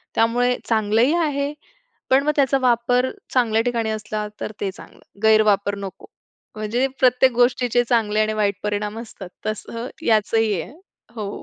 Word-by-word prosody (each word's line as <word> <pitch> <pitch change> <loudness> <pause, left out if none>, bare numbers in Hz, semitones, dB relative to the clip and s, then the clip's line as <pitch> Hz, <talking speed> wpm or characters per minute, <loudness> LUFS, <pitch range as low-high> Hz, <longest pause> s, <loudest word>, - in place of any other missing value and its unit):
त्यामुळे 245 +2 +2
चांगलंही 225 +5 +2
आहे. 290 -3 -1 0.6
पण 265 +1 +4
मग 300 - +2
त्याचा 275 -1 +3
वापर 245 +1 +2 0.2
चांगल्या 225 -3 +3
ठिकाणी 230 -2 -1
असला 215 0 -3
तर - - -3
ते 195 - -1
चांगलं, - - -15 0.2
गैरवापर 215 -2 +4
नको. 195 -1 -8 0.5
म्हणजे 220 +5 0
प्रत्येक 255 0 +4
गोष्टीचे 245 0 +2
चांगले 215 -3 +2
आणि 215 0 0
वाईट 205 -2 0
परिणाम 210 +1 -2
असतात 215 -5 -10 0.2
तसं 230 +2 -4 0.2
याच 215 -2 +2
ही 215 -5 +1
आहे. - - -10 0.4
हो. 210 -3 -4
225 Hz, 145 wpm, -22 LUFS, 210-245 Hz, 0.6 s, पण